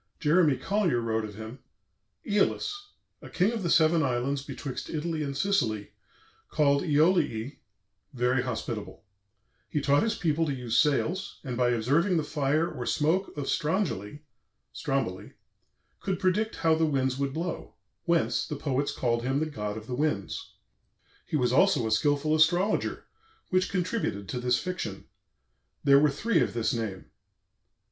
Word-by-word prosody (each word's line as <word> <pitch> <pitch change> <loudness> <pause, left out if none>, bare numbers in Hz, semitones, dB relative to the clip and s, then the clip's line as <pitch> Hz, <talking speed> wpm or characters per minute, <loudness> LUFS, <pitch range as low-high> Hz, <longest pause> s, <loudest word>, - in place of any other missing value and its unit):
Jeremy 155 -3 +3
Collier 195 - +1
wrote 110 -1 -1
of 105 -1 -9
him: 110 +5 -8 0.7
"Æolus, 210 - +1 0.5
a - - -10
king 190 +5 +2
of 230 -2 -3
the 175 - -1
seven 160 0 +4
islands 135 0 0
betwixt 135 -1 -6
Italy 160 0 -2
and 140 -2 -3
Sicily 120 - 0 0.6
called 140 -2 +3
Æoliæ, 145 -5 +2 0.5
very 125 -1 +1
Hospitable, 115 -4 -5 0.7
he 150 - 0
taught 140 0 +3
his 225 +1 0
People 165 -1 0
to 140 - -1
use 120 -3 -3
Sails, 165 +5 +1
and 130 -4 -4
by 125 0 +2
observing 145 - +2
the 160 - +1
Fire 150 +2 0
or 120 - -6
Smoak 165 +4 0
of 145 - -3
Strongyle 150 - -1 0.6
(Stromboli) 135 -10 -3 0.7
could 190 -2 -2
predict 210 +4 +1
how 160 -1 +2
the 160 0 +2
Winds 130 -2 0
would 140 -1 0
blow, 170 +1 -4 0.3
whence 170 -1 +1
the 150 - -4
Poets 140 0 -1
call'd 120 -2 0
him 135 +3 0
the 155 - 0
God 105 -8 -4
of 110 - -8
the 125 - -6
Winds. 125 -8 -2 0.7
He 155 - 0
was 125 -2 +1
also 190 - +4
a 110 - -1
skilful 145 +6 +2
Astrologer, 175 +6 +2 0.5
which 185 0 +2
contributed 180 - -2
to 125 - -3
this 125 0 +2
Fiction. 175 - -5 0.8
There 140 -1 +6
were 150 +1 +4
Three 165 +7 +1
of 125 - 0
this 115 -2 0
Name." 110 -5 -4
145 Hz, 155 wpm, -28 LUFS, 125-170 Hz, 0.8 s, There